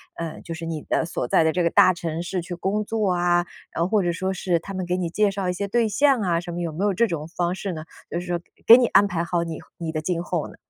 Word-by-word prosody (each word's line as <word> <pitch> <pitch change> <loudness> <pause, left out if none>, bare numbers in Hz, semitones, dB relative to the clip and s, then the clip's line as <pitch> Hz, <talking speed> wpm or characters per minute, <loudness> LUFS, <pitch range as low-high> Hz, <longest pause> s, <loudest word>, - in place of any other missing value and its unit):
呃， 165 -2 -6
就 170 - -6
是 165 0 -6
你 160 -2 -4
的 - - 0
所 165 - -3
在 160 - +4
的 160 - +2
这 180 - +1
个 170 - +3
大 185 +2 +6
城 165 -1 -4
市 180 +1 -2
去 175 +1 -6
工 195 +4 -1
作 210 -3 0
啊， 175 0 +2 0.3
然 165 - -3
后 170 - +2
或 210 -1 +2
者 175 - +1
说 190 +3 -2
是， 180 -2 0
他 195 +4 -8
们 185 -1 -3
给 180 +1 -1
你 175 -2 -2
介 205 +3 +2
绍 195 -1 -3
一 - - 0
些 200 +3 -3
对 230 +1 +2
象 275 +4 +3
啊， 175 -4 +1
什 175 0 -7
么 175 - -4
有 170 -2 -3
没 175 +6 -3
有 205 -1 +2
这 235 +5 +2
种 165 -6 -4
方 175 +1 -1
式 195 0 -4
呢？ 155 -2 -6 0.3
就 170 - -1
是 175 - -7
说， 175 -1 0 0.3
给 230 - +12
你 255 - +3
安 205 - +5
排 170 -3 -1
好 170 0 0
你 165 -2 -5 0.2
你 165 -1 -4
的 155 - -2
今 170 +1 -1
后 175 -2 -3
呢？ - - -13
175 Hz, 325 characters per minute, -24 LUFS, 170-195 Hz, 0.3 s, 给